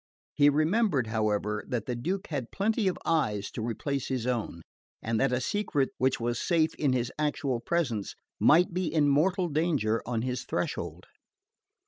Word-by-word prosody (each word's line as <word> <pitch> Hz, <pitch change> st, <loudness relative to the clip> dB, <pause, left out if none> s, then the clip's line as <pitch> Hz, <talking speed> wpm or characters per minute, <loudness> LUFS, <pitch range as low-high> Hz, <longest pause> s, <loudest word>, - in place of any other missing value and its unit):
He 145 Hz, -1 st, +5 dB
remembered, 155 Hz, -, +2 dB
however, 105 Hz, -1 st, -1 dB
that 120 Hz, -4 st, -2 dB
the 125 Hz, -, -2 dB
Duke 185 Hz, +11 st, -2 dB
had 135 Hz, -7 st, -3 dB
plenty 215 Hz, +1 st, 0 dB
of 185 Hz, -, 0 dB
eyes 105 Hz, -11 st, 0 dB
to -, -, -5 dB
replace 125 Hz, +4 st, -2 dB
his 130 Hz, -3 st, -2 dB
own, 115 Hz, -9 st, -2 dB, 0.4 s
and 115 Hz, 0 st, -1 dB
that 135 Hz, -1 st, +2 dB
a 125 Hz, -, +1 dB
secret 145 Hz, -, 0 dB
which 130 Hz, +1 st, +2 dB
was 120 Hz, 0 st, -1 dB
safe 165 Hz, -3 st, +2 dB
in 145 Hz, -3 st, 0 dB
his 125 Hz, -1 st, 0 dB
actual 145 Hz, -4 st, 0 dB
presence 120 Hz, -9 st, -1 dB, 0.2 s
might 175 Hz, +3 st, +5 dB
be 180 Hz, -3 st, -1 dB
in 150 Hz, -2 st, +3 dB
mortal 180 Hz, +6 st, +2 dB
danger 145 Hz, -9 st, +1 dB
on 115 Hz, -2 st, -1 dB
his 125 Hz, 0 st, -2 dB
threshold. -, -, -3 dB
135 Hz, 165 wpm, -28 LUFS, 120-165 Hz, 0.4 s, He